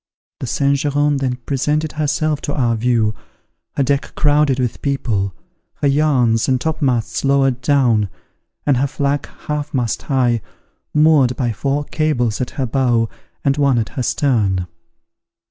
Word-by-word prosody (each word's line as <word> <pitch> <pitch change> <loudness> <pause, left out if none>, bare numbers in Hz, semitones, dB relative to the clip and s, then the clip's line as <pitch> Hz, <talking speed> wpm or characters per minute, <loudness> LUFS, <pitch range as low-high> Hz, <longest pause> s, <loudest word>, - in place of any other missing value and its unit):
The 130 - -4
Saint 140 +3 +1
Geran 145 0 +1
then 130 -2 -1
presented 150 +3 0
herself 155 0 -1
to 145 - -3
our 120 -4 +1
view, 115 -2 +1 0.6
her 140 - +3
deck 140 +1 -1
crowded 145 -2 +3
with 125 -3 -2
people, 115 -9 -1 0.4
her 145 - 0
yards 135 -6 +2
and 130 -1 +2
topmasts 135 -6 -1
lowered 135 -2 +2
down, 120 -7 +2 0.6
and 140 -3 +3
her 135 +3 +1
flag 140 0 -1 0.2
half 150 -1 -3
mast 120 -4 -1
high, 125 -5 +1 0.5
moored 150 -5 +4
by 120 -4 -1
four 140 +6 -1
cables 130 -8 -1
at 125 - -2
her 135 - 0
bow 120 -2 +1 0.4
and 140 0 +2
one 140 -4 +3
at 115 -2 -1
her 135 - -4
stern. 110 - +1
135 Hz, 145 wpm, -18 LUFS, 120-145 Hz, 0.6 s, moored